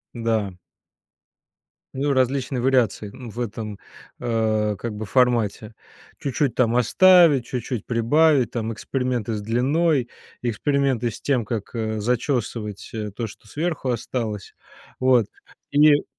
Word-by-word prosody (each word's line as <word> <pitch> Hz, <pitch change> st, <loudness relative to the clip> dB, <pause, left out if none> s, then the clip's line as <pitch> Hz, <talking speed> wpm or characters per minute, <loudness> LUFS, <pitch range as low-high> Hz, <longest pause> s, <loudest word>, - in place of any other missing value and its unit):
Да. 110 Hz, -5 st, -1 dB, 1.4 s
Ну, 140 Hz, +2 st, +1 dB
различные 130 Hz, 0 st, +1 dB
вариации, 125 Hz, -5 st, +2 dB
м, 125 Hz, -3 st, -9 dB
в 120 Hz, -, -9 dB
этом, 105 Hz, -3 st, -4 dB, 0.4 s
а, 110 Hz, -3 st, 0 dB
как 110 Hz, +2 st, -5 dB
бы 110 Hz, -, -5 dB
формате. 115 Hz, -2 st, +1 dB, 0.5 s
Чуть-чуть 140 Hz, -2 st, 0 dB
там 120 Hz, -2 st, +2 dB
оставить, 160 Hz, -, +6 dB
чуть-чуть 125 Hz, -2 st, -4 dB
прибавить, 130 Hz, +2 st, +3 dB
там 115 Hz, -1 st, -3 dB
эксперименты 125 Hz, -2 st, -2 dB
с 105 Hz, -, -2 dB
длиной, 130 Hz, +5 st, +1 dB, 0.3 s
эксперименты 125 Hz, +1 st, 0 dB
с 105 Hz, -, -9 dB
тем, 125 Hz, -6 st, 0 dB
как, 110 Hz, 0 st, -4 dB
э, 110 Hz, -2 st, -2 dB
зачёсывать, 115 Hz, -3 st, -2 dB
э, 105 Hz, -2 st, -4 dB
то, 115 Hz, -, -3 dB
что 105 Hz, -, -15 dB
сверху 150 Hz, 0 st, -2 dB
осталось. 110 Hz, -4 st, -4 dB, 0.4 s
Вот. 125 Hz, -4 st, +4 dB, 0.4 s
И 145 Hz, 0 st, +5 dB
120 Hz, 120 wpm, -23 LUFS, 110-135 Hz, 1.4 s, оставить